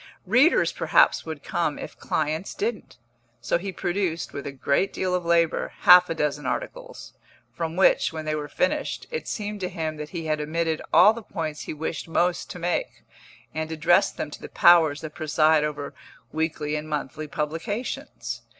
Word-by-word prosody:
Readers 250 - +4
perhaps - - +3
would - - -6
come, - - -1
if - - -8
clients 155 +4 -2
didn't; 220 +1 -4 0.4
so 120 +8 0
he 195 +2 -5
produced, 175 -2 -2
with 140 - -6
a - - -4
great 140 +7 0
deal 185 -1 -2
of 180 -1 0
labour, 170 -1 +1
half 180 0 +8
a 165 - -2
dozen 150 -1 -1
articles, - - -5 0.4
from 165 -1 -4
which, 190 - +4
when 160 -1 -6
they 155 - -1
were 150 -1 -3
finished, 180 +5 -1
it 470 - -4
seemed 210 -1 -4
to 185 -1 -3
him 160 -3 -4
that 150 0 -6
he 165 -2 -5
had 155 -1 0
omitted 160 +1 -1
all 210 +4 +7
the 230 - -7
points 160 -7 -5
he - - -4
wished 160 +2 -4
most 175 +2 0
to - - -7
make, 175 0 -2 0.5
and 160 0 -3
addressed 165 +2 +2
them 150 - -4
to - - -10
the - - -8
powers 160 -4 +5
that 155 -1 -7
preside 155 -1 +3
over 150 -1 -4 0.4
weekly 155 -1 -2
and 150 +1 -5
monthly 150 +1 -4
publications. 165 - -4
160 Hz, 175 wpm, -25 LUFS, 155-180 Hz, 0.5 s, half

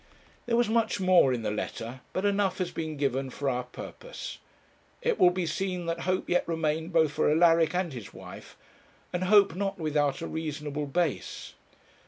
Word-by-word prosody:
There 235 -1 +2
was 240 -1 +3
much 225 -1 +1
more 185 -7 +5
in 120 -3 -2
the 105 - -1
letter, 115 +4 -5
but 185 - -2
enough 200 -2 +1
has 185 -2 -2
been 160 -2 -4
given 135 -1 0
for 140 +2 -4
our 125 -1 0
purpose. - - -8 0.6
It 475 -2 +1
will 180 - +7
be 180 0 -2
seen 180 +1 -2
that 165 0 -2
hope 185 0 0
yet 180 - +1
remained 160 0 -1
both 160 -3 +3
for - - +1
Alaric 165 +1 +4
and 180 -4 -1
his 115 -6 -8
wife; - - -11 0.6
and 180 +1 -1
hope 200 -1 +6
not 195 +2 -2
without 150 -4 0
a - - -3
reasonable 150 -2 -4
base. 140 - -2
165 Hz, 180 wpm, -28 LUFS, 145-185 Hz, 0.6 s, will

